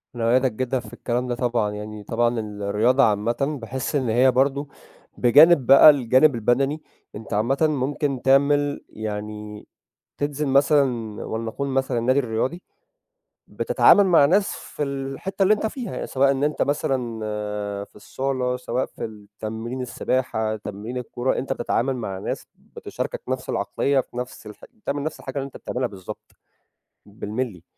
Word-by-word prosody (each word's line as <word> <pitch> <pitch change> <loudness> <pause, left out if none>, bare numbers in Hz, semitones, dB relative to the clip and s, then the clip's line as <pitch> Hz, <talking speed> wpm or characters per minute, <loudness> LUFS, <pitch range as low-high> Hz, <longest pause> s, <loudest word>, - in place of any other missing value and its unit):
أنا 115 -1 +1
أؤيّدك 130 0 +3
جدًا 130 +3 -2
في - - -12
الكلام 125 +1 -2
ده 120 - -1
طبعًا، 120 -4 0
يعني 105 0 -7
طبعًا 120 +2 0
الرياضة 105 +5 +1
عامةً 120 +7 +1
باحس 130 +5 -4
إن 130 -4 0
هي 125 +4 +4
برضه 140 +3 +1 0.5
بجانب 145 +4 +6
بقى 135 +4 +9
الجانب 135 0 +4
البَدَني، 135 +7 +1 0.3
أنت 110 +1 -7
عامةً 115 +7 +1
ممكن 140 -1 -1
تعمل 145 +2 +3
يعني 105 0 -6 0.5
تنزل 145 +1 -2
مثلًا 135 -5 +2
ولنقول 115 +5 -4
مثلًا 135 -2 0
النادي 130 +4 +2
الرياضي، 130 +7 -2 0.9
بتتعامل 205 - +4
مع 165 -6 +6
ناس 195 +7 +3
في - - -7
الحتّة 140 +8 -3
اللي 200 +3 +5
أنت 215 - -2
فيها، 240 +2 -5
سواء 135 +1 +2
إن 140 +1 0
أنت 150 0 0
مثلًا 130 -5 -1 0.7
في - - -25
الصالة، 130 +2 -2
سواء 125 0 -2
في - - -8
التمرين 110 +3 -7
السباحة، 120 -3 -1
تمرين 105 +4 -7
الكورة، 125 +1 -2
أنت 135 +1 -2
بتتعامل 130 +1 -1
مع 100 -6 -4
ناس - - -5 0.3
بتشاركك - - -5
نَفْس - - -3
العقلية 140 -1 0
في 125 - -11
نَفْس 125 -2 -6
الح 105 - -11
بتعمل 140 +6 -4
نَفْس 155 - -5
الحاجة - - -8
اللي 135 - -3
أنت 140 - -12
بتعملها 125 0 -3
بالضبط، 95 -4 -10 0.7
بالمللي، 105 -2 -5
125 Hz, 145 wpm, -23 LUFS, 110-140 Hz, 0.9 s, بقى